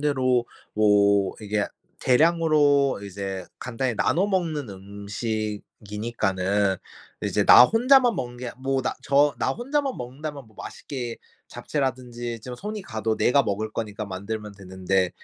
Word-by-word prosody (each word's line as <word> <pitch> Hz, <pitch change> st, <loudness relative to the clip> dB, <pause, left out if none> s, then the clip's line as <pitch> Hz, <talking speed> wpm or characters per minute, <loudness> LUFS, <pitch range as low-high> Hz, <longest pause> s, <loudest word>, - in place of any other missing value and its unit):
대로 130 Hz, -4 st, +1 dB, 0.3 s
뭐 100 Hz, -2 st, +3 dB
이게 105 Hz, -1 st, -1 dB, 0.3 s
대량으로 145 Hz, -2 st, +3 dB
이제 95 Hz, -1 st, -5 dB
간단히 125 Hz, 0 st, -2 dB
나눠 165 Hz, -, +2 dB
먹는 165 Hz, -, -1 dB
음식이니까는 100 Hz, -1 st, -2 dB, 0.5 s
이제 -, -, +1 dB
나 -, -, +10 dB
혼자만 245 Hz, -, +4 dB
먹는 120 Hz, 0 st, -5 dB
게 125 Hz, -1 st, -5 dB
뭐 135 Hz, 0 st, 0 dB
나 -, -, -1 dB
저 140 Hz, 0 st, +3 dB
나 -, -, +1 dB
혼자만 275 Hz, +2 st, -1 dB
먹는다면 140 Hz, +2 st, -7 dB
뭐 110 Hz, -2 st, -23 dB
맛있게 120 Hz, -4 st, -6 dB, 0.3 s
잡채라든지 120 Hz, -4 st, -3 dB
좀 125 Hz, +2 st, -7 dB
손이 210 Hz, -, -5 dB
가도 110 Hz, -7 st, -2 dB
내가 140 Hz, +3 st, +4 dB
먹을 110 Hz, 0 st, -2 dB
거니까 105 Hz, -1 st, -4 dB
만들면 105 Hz, +2 st, -5 dB
되는데 95 Hz, -1 st, -1 dB
120 Hz, 280 characters per minute, -25 LUFS, 105-140 Hz, 0.5 s, 나